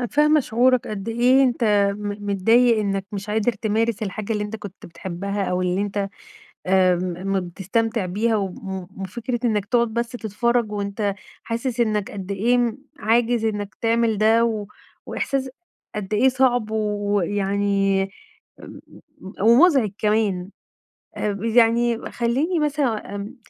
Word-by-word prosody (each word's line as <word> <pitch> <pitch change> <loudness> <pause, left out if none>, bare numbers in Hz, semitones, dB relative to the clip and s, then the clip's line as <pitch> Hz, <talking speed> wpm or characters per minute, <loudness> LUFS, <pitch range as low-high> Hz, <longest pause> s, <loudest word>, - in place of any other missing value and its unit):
أنا 245 - -1
فاهمة 300 +3 +4
شعورك 250 0 +2
قد 205 -1 -5
إيه 245 +4 +4
أنت 245 -2 +1 0.3
م 205 0 -5
متضايق 225 +4 +4
إنّك 195 -2 -1
مش 200 +1 -5
قادر 220 +2 +1
تمارس 220 0 -1
الحاجة 210 +2 -3
اللي 210 -1 -1
أنت 210 +2 -5
كنت 205 -3 -10
بتحبّها، 195 +4 -4
أو 180 0 -1
اللي 180 +1 0
أنت 200 -1 -2 0.6
آمم، 185 0 +1
م 195 - +2
بتستمتع 200 +5 -2
بيها 215 +5 0
وم 195 -3 -2 0.4
م - - -7
وفكرة 235 +6 -4
إنّك 210 -4 +1
تقعُد 235 +2 +2
بس 235 0 -1
تتفرّج 235 0 -1
وأنت 200 0 -2 0.3
حاسس 235 +1 -3
إنّك 215 -3 0
قد 195 -1 -6
إيه 235 +3 +1 0.2
عاجز 230 0 +2
إنّك 205 -2 -3
تعمل، 230 -1 +2
ده 225 +2 +4
و 215 -3 -2 0.4
وإحساس 270 -1 -2 0.5
قد 210 -1 -4
إيه 240 +5 +4
صعب 245 -4 +1
ويعني 200 -1 0 0.6
م - - -11 0.4
م 190 - -9
ومُزعِج 245 - +5
كمان 210 -4 0 0.7
أب 205 0 -3
يعني 230 0 +2
خلّيني 265 +9 0
مثلًا 280 -9 -1
آمم 205 +4 -6
215 Hz, 140 wpm, -22 LUFS, 200-235 Hz, 0.7 s, ومُزعِج